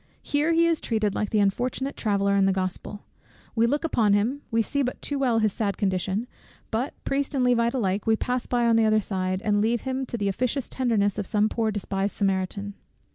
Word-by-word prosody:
Here 295 +3 +1
he 335 0 +4
is 335 -1 +1
treated 215 -3 0
like 210 - -2
the 215 - 0
unfortunate 245 +7 0
traveller 200 -2 +1
in 195 -1 +4
the - - +3
Gospel; 190 +2 -4 0.5
we 230 0 +3
look 290 +6 0
upon 225 -10 +2
him; 235 +8 +1
we 225 -1 +2
see 280 +5 -1
but 255 -2 -2
too 285 -1 -3
well 250 -4 +2
his 215 -3 +2
sad 205 -3 -1
condition, 190 +2 -1 0.5
but 240 +5 -2
(Priest 280 +1 -1
and 260 - +2
Levite 235 0 +2
alike) 200 -4 -1
we 220 - +4
pass 250 +2 -2
by 240 -1 +1
on 230 -1 +4
the 225 - +4
other 215 0 +4
side, 185 -1 -2
and 205 -1 +2
leave 230 +2 +1
him 265 0 -3
to 235 - -4
the 205 -2 -1
officious 250 +6 -1
tenderness 215 -6 0
of 200 - -2
some 215 0 +2
poor 225 -1 0
despised 200 -1 -2
Samaritan. 200 +1 -1
220 Hz, 215 wpm, -25 LUFS, 200-250 Hz, 0.5 s, he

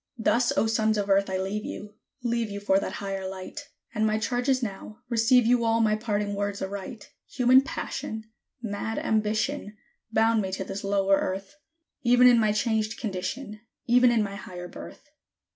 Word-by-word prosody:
Thus, 235 +2 +2
O - - +3
Sons 220 -1 +1
of 200 -1 -1
Earth, 195 0 +3
I 190 - -1
leave 195 +3 -3
you! 210 0 -7 0.3
leave 235 -2 0
you 200 0 -5
for 195 -1 +2
that - - -4
higher 195 -1 -4
light; 190 +10 -8 0.2
And 215 -1 0
my 215 0 +2
charge 245 +4 -1
is 260 -1 +2
now, 210 0 -6
Receive 235 +1 +4
you 240 0 +3
all 225 0 +2
my 215 -2 +3
parting 210 -2 -2
words 200 0 -2
aright: 200 +3 -6 0.2
Human 255 +1 +5
passion, 220 -4 -5 0.4
mad 220 +1 -3
ambition, 215 +1 -1 0.3
bound 225 0 +3
me 190 -1 -3
to 190 - -2
this 195 +2 -6
lower 195 0 +2
Earth, 195 +8 -4 0.4
Even 245 0 +5
in 245 -2 +7
my 215 -2 +3
changed 220 0 0
condition 210 +3 -4 0.3
even 245 +1 +5
in 230 -2 +2
my 200 -1 -4
higher 180 -3 -8
birth. 290 - -12
215 Hz, 175 wpm, -26 LUFS, 200-235 Hz, 0.4 s, in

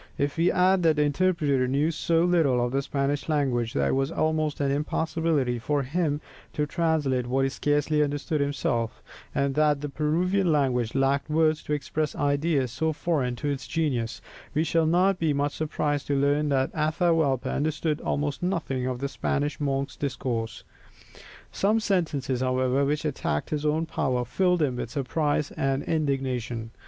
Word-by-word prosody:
If 140 0 -1
we 170 +2 +3
add 185 0 +3
that 160 -2 +4
the 150 - +2
interpreter 145 -4 +1
knew 140 +5 +1
so 165 +1 +1
little 160 -8 +3
of 120 - -3
the 135 +1 +1
Spanish 140 +2 -2
language 125 -6 0
that - - +1
it - - +1
was 135 +3 0
almost 155 -2 0
an 140 -1 +1
impossibility 150 -3 0
for 145 +4 0
him 150 +1 -1 0.3
to 150 - 0
translate 150 -6 0
what 135 +2 +1
he - - +1
scarcely 145 +2 +1
understood 145 +1 -1
himself, 120 -5 -1 0.3
and 140 0 +1
that 150 -1 +2
the 145 - -3
Peruvian 175 +6 +1
language 130 -6 +1
lacked 135 +2 +1
words 155 0 +2
to 150 - -3
express 150 +1 -2
ideas 145 -2 +1
so 160 +5 -1
foreign 145 -5 -1
to 145 +4 -3
its 140 -2 -3
genius, 130 -8 -1 0.3
we 155 - +3
shall 165 0 +2
not 180 +3 +3
be 160 -3 +1
much 145 +1 0
surprised 150 -2 -1
to 140 - +1
learn 145 +2 +2
that 135 -1 +1
Atahualpa 155 -3 +1
understood 155 +1 -1
almost 145 -1 -2
nothing 160 -9 -1
of 130 -1 -2
the 140 - 0
Spanish 145 +1 -2
monk's 140 -1 -1
discourse. 120 -5 -3 0.9
Some 215 +3 +2
sentences, 155 - -1
however, 130 +1 +1
which 150 +2 -1
attacked 130 - -2
his 150 0 -1
own 155 +2 +1
power, 125 -5 -1
filled 180 +2 +1
him 130 -4 0
with 120 - -4
surprise 145 +2 -1
and 135 0 -1
indignation. 130 -7 -2
145 Hz, 165 wpm, -26 LUFS, 135-160 Hz, 0.9 s, that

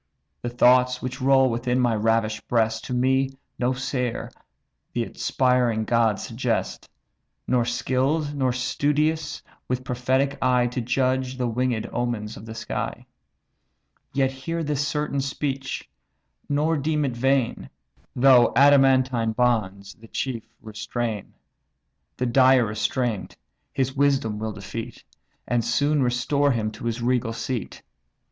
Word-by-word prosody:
The 120 - -3
thoughts 125 +1 +4
which 130 0 -5
roll 135 0 +5
within 125 +2 0
my 120 -2 +2
ravish'd 110 0 0
breast, 110 -2 +1
To 125 - -4
me, 130 +2 +2 0.3
no 125 +1 +1
seer, 125 -2 -3 0.6
the 120 - 0
inspiring 125 -2 +1
gods 115 -3 +2
suggest; 115 -1 -2 0.6
Nor 125 -2 +2
skill'd 135 +5 0
nor 130 -3 +1
studious, 150 +5 0 0.2
with 125 0 -2
prophetic 130 +2 0
eye 125 -1 +3
To 125 +1 -2
judge 130 +1 0
the 125 -1 0
winged 120 -1 -1
omens 115 -3 -2
of 110 - -11
the 110 - -7
sky. 115 0 -4 1.1
Yet 135 -1 +1
hear 165 +6 -4
this 145 -2 -1
certain 150 -1 -1
speech, 135 0 -3 0.6
nor 150 +3 +1
deem 150 +1 0
it 125 -3 -2
vain; 135 0 0 0.5
Though 125 -1 +6
adamantine 130 -4 +4
bonds 105 -5 0
the 115 - -16
chief 120 -1 -4 0.2
restrain, 110 0 -4 0.8
The 125 - -1
dire 130 0 +5
restraint 110 +1 -2 0.3
his 135 0 -1
wisdom 135 -7 +1
will 110 0 -3
defeat, 115 +4 -7 0.4
And 120 -1 +1
soon 145 +5 +1
restore 130 +3 +1
him 110 -2 -1
to - - -9
his 115 0 -2
regal 120 -2 +1
seat. 120 -1 -5
125 Hz, 130 wpm, -24 LUFS, 115-135 Hz, 1.1 s, Though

